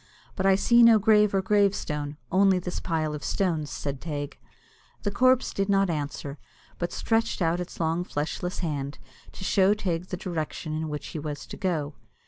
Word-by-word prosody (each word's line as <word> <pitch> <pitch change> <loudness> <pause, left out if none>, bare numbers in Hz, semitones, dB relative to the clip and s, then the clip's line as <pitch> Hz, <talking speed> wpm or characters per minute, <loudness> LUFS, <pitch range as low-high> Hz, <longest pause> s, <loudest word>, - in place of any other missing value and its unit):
"But 190 -1 +1
I 195 - +6
see 235 +4 +4
no 230 -1 +8
grave 210 -1 +4
or 195 -1 +1
gravestone, 185 -8 +1
only 195 0 +4
this 180 0 -4
pile 155 -3 -1
of 150 - -6
stones," 165 -7 0
said 140 -2 -4
Teig. 145 -3 -5 0.6
The 205 - 0
corpse 255 +4 +3
did 195 0 -1
not 195 -2 +3
answer, 145 -1 -4 0.4
but 175 - -2
stretched 225 0 0
out 170 -1 +1
its 180 - -6
long 165 +1 0
fleshless 180 +3 -3
hand, 145 -2 -3 0.4
to - - -9
show 195 +1 +4
Teig 180 -4 -2
the 180 - -4
direction 160 -3 -4
in 155 0 -2
which 150 0 -5
he 155 - -5
was 145 -1 -5
to - - -9
go. 160 -6 -2
175 Hz, 180 wpm, -27 LUFS, 150-195 Hz, 0.6 s, no